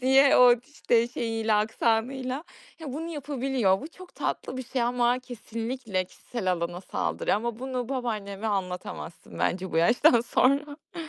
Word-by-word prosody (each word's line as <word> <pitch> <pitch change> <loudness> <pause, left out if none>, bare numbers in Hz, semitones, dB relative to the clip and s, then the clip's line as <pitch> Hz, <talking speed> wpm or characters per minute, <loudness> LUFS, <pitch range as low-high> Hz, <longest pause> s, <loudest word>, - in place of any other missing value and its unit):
diye 265 +2 +6
o, 245 -1 +8
işte, 240 -5 +1
şeyiyle, 225 -2 -1
aksanıyla 240 +6 0 0.4
ya, 295 -5 -6
bunu 325 +4 -4
yapabiliyor. 270 - 0
Bu 300 - -7
çok 365 +2 -14
tatlı 255 - -3
bir 260 - -4
şey 255 0 -1
ama 245 +1 +2
kesinlikle 230 -4 -4
kişisel 190 +1 -3
alana 175 0 -3
saldırı - - -1
ama 230 +1 -2
bunu 255 -2 -3
babaanneme 220 -6 -3
anlatamazsın 180 -4 -4
bence 185 +1 -1
bu - - -1
yaştan 235 - +5
sonra. 285 +6 0
240 Hz, 140 wpm, -27 LUFS, 215-265 Hz, 0.4 s, o